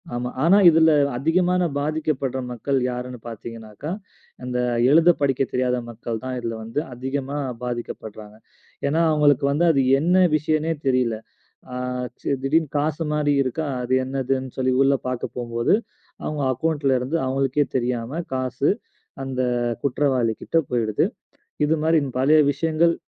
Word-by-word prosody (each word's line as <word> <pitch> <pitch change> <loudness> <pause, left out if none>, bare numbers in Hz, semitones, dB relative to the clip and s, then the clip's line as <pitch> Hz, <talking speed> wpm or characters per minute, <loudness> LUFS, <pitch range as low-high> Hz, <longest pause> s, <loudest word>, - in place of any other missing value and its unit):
ஆமா. 125 +1 -2
ஆனா, 185 +5 +6
இதுல 160 0 +5 0.3
அதிகமான 180 +5 +2
பாதிக்கப்படுற 145 -3 -1
மக்கள் 135 +3 -1
யாருன்னு 125 0 -6
பார்த்தீங்கன்னாக்கா, 115 +5 -8 0.5
அந்த 125 0 -3 0.3
எழுதப் 165 +1 +5
படிக்கத் 135 -1 +1
தெரியாத 125 0 +1
மக்கள்தான் 120 +2 -5
இதுல 115 -1 -4
வந்து 115 +6 -3
அதிகமா 135 +3 -4 0.3
பாதிக்கப்பட்றாங்க. 110 -3 -6 0.5
ஏன்னா, 160 +4 +2
அவங்களுக்கு 145 -3 +3
வந்து 165 +5 +2
அது 135 -3 +2 0.2
என்ன 180 +4 +4
விஷயன்னே 155 +1 0
தெரியல. 125 -4 +2 0.6
ஆ, - - -4 0.3
இச்சு - - -9
திடீர்னு 155 +1 +1
காசு 155 +2 -1
மாரி 145 -1 +2
இருக்கா. 145 +5 -2 0.2
அது 125 +1 0
என்னதுன்னு 130 -1 -2
சொல்லி 130 0 +1
உள்ள 140 0 +4
பார்க்கப் 125 -2 -4
போகும்போது 120 +4 0 0.5
அவங்க 150 -2 -2
அக்கௌன்ட்ல 145 -2 +1
இருந்து 130 +7 -2
அவங்களுக்கே 135 +2 +1
தெரியாம, 125 +5 -2
காசு 130 +2 0 0.5
அந்த 130 -1 -2 0.4
குற்றவாளிகிட்ட 130 -1 0
போயிடுது. 115 -4 +1 0.6
இது 160 +2 +2
மாதிரி 160 0 +4 0.2
பல 150 +4 +5
விஷயங்கள், 160 +3 +2
135 Hz, 125 wpm, -23 LUFS, 125-155 Hz, 0.6 s, ஆனா